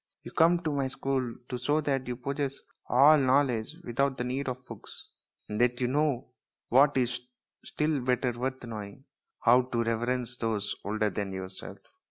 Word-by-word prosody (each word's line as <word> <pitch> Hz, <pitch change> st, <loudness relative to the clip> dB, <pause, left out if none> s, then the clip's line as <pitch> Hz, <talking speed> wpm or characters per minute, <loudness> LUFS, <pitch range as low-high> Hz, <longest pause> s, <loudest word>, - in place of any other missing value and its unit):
You -, -, -9 dB
come 170 Hz, +2 st, +5 dB
to 155 Hz, -, 0 dB
my 140 Hz, -2 st, 0 dB
school 130 Hz, -2 st, -2 dB
to 125 Hz, -, -3 dB
show 145 Hz, +5 st, +1 dB
that 135 Hz, -3 st, -1 dB
you 125 Hz, -, -2 dB
possess 140 Hz, +2 st, -3 dB, 0.3 s
all 145 Hz, +5 st, +7 dB
knowledge 130 Hz, -2 st, +2 dB
without 135 Hz, 0 st, 0 dB
the 125 Hz, -, -2 dB
need 130 Hz, +2 st, -2 dB
of 130 Hz, 0 st, -6 dB
books, 115 Hz, -5 st, -11 dB, 0.4 s
and 105 Hz, +2 st, -2 dB
that 125 Hz, 0 st, +2 dB
you 125 Hz, -, +1 dB
know 140 Hz, -2 st, 0 dB, 0.4 s
what 135 Hz, +3 st, +5 dB
is 125 Hz, -1 st, +1 dB, 0.4 s
still 150 Hz, -2 st, -1 dB
better 125 Hz, 0 st, +1 dB
worth 130 Hz, +2 st, -4 dB
knowing 110 Hz, +1 st, -7 dB, 0.4 s
how 125 Hz, +2 st, +6 dB
to 120 Hz, -2 st, -1 dB
reverence 120 Hz, +1 st, -1 dB
those 110 Hz, -3 st, -2 dB
older 105 Hz, +1 st, 0 dB
than 100 Hz, +1 st, -3 dB
yourself." 95 Hz, 0 st, -7 dB
125 Hz, 170 wpm, -29 LUFS, 115-135 Hz, 0.4 s, all